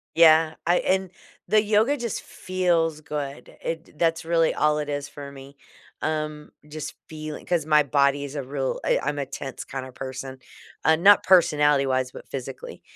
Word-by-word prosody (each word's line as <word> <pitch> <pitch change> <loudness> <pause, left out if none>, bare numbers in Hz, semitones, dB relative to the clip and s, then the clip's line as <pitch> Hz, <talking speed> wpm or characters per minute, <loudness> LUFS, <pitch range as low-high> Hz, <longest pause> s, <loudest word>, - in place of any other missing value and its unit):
Yeah. 160 -1 +6
I 175 +1 +4
and 190 0 0 0.4
the 215 0 +5
yoga 220 +7 +2
just 235 -4 -3
feels 170 -4 0
good. 140 -4 -6
It 165 -2 -6
that's 165 -1 +1
really 165 0 +2
all 150 0 +2
it 150 - -3
is 145 0 -3
for 145 -1 -9
me. 140 0 -13 0.4
Um, 155 -1 -3 0.2
just 150 -1 -6 0.2
feeling 155 -1 -7
'cause 170 -4 0
my 150 -1 +5
body 140 +1 +2
is 145 +1 -7
a 140 - -3
real 135 0 -3
I - - +3
I'm 145 -1 -2
a 140 - -2
tense 135 0 -7
kinda 130 -1 -6
person. 130 0 -7 0.5
Uh, 160 - +6
not 195 +5 +6
personality-wise, 145 -7 +3
but - - -11
physically. 305 - -7
150 Hz, 165 wpm, -25 LUFS, 140-165 Hz, 0.5 s, Yeah